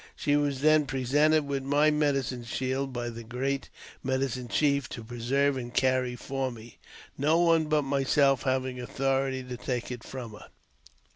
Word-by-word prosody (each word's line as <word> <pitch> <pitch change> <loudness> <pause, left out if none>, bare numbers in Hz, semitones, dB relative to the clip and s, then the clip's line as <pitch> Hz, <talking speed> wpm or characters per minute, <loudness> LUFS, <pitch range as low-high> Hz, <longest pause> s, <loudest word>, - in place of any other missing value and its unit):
She 145 - +1
was 145 -2 0
then 155 -1 +4
presented 145 +4 +2
with 140 -1 -2
my 145 +3 +3
medicine 140 -5 0
shield 130 +3 -2
by 120 -1 -3
the 115 0 -8
great 130 +4 -3 0.3
medicine 130 -1 -1
chief, 140 +3 +1
to 115 - -7
pre 120 +2 -8
serve 140 +3 +2
and 120 -1 -5
carry 130 -1 +1
for 135 +2 -3
me, 115 -1 -12 0.4
no 155 +4 +3
one 165 -2 +4
but 150 -1 +1
myself 135 0 +2
having 130 -1 -1
authority 135 +1 -1
to 125 -1 -7
take 125 0 -3
it 125 -2 -6
from 125 -4 -7
her. 105 - -12
135 Hz, 165 wpm, -28 LUFS, 125-140 Hz, 0.4 s, then